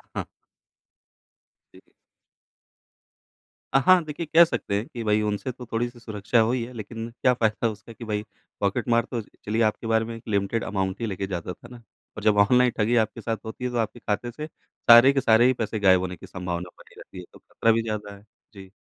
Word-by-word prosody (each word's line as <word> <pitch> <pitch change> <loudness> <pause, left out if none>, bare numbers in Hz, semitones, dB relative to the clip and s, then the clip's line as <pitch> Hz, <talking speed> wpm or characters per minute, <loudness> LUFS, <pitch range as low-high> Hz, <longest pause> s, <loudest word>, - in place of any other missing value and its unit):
हाँ। - - -3 1.5
जी। - - -16 1.9
अ, - - +6
हाँ। 185 -2 +6
देखिए, 155 +2 -5
कह 160 +2 +6
सकते 100 -10 -3
हैं 105 - -3
कि, 120 -7 -7
भई 105 0 +2
उनसे 105 +4 -2
तो 125 0 -11
थोड़ी-सी 120 +1 -2
सुरक्षा 110 0 -1
हुई 115 +2 +1
है। 125 - -11
लेकिन 115 0 -7
क्या 125 - +4
फ़ायदा 110 -1 0
उसका 110 +2 -10
कि 115 - -10
भाई 105 -1 -2 0.4
पॉकेटमार, 115 +4 +1
तो 120 - -2
चलिए 110 +1 -4
आपके 110 +1 -1
बारे 110 0 +2
में 115 0 -6
एक 115 - -12
लिमिटेड 100 +2 0
अमाउंट 95 -1 -2
ही - - 0
लेके 95 -1 -4
जाता 90 -2 -4
था - - -15
ना? 120 -1 -12 0.4
और 105 - -6
जब 105 -1 +3
ऑनलाइन 125 +4 +4
ठगी 110 +2 +2
आपके 110 - -12
साथ 115 -1 -2
होती 110 +3 -6
है 125 - -2
तो 120 - -3
आपके 115 +1 -2
खाते 115 +2 -3
से 150 +5 -7
सारे 120 -4 +5
के 135 - +1
सारे 115 -1 +5
ही 130 - +4
पैसे 110 -2 -3
गायब 95 -2 +5
होने 90 0 -4
की - - -13
संभावना 90 -1 -5
बनी - - -18
रहती 95 - -12
है - - -8
तो - - -15
ख़तरा 115 - 0
भी 115 +1 +2
ज़्यादा 105 -2 -5
है। 100 - -18 0.3
जी। 95 -2 -12
110 Hz, 210 wpm, -25 LUFS, 105-120 Hz, 1.9 s, अ